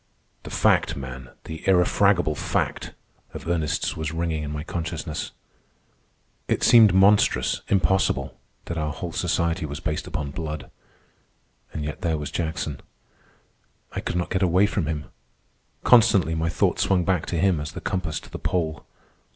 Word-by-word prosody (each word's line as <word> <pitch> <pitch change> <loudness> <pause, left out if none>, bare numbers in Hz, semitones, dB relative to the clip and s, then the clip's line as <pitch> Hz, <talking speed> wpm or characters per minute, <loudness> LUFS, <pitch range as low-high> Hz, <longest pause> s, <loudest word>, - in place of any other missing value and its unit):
"The - - -9
fact, - - +2
man, 65 -1 -7
the 80 0 -7
irrefragable 90 -2 +3
fact!" - - -2 0.4
of - - -7
Ernest's 80 -4 -1
was 80 0 -3
ringing 80 -1 -2
in 75 - -4
my 75 0 -4
consciousness. 80 -1 -4 1.2
It - - 0
seemed 115 -4 +7
monstrous, 100 +3 +4
impossible, 95 0 +1 0.3
that 85 -1 -4
our 75 0 -1
whole - - -5
society 85 +1 0
was 75 +1 -6
based 80 -2 -3
upon 70 -2 -4
blood. 75 -2 -6 1.0
And 75 - -4
yet 75 0 -5
there 80 -3 0
was 75 -1 -5
Jackson. 80 -4 -3 1.1
I - - -4
could - - -4
not 90 0 -2
get 95 - 0
away 90 +2 +4
from 100 -6 -1
him. 75 -2 -3 0.8
Constantly 105 -9 +5
my 80 +1 0
thought 85 - +1
swung 90 -3 +2
back 90 -4 0
to 85 - -2
him 90 -1 +2
as 75 0 -5
the - - -6
compass 90 -4 -2
to - - -15
the - - -6
Pole. 80 -5 -2
80 Hz, 155 wpm, -24 LUFS, 75-90 Hz, 1.2 s, seemed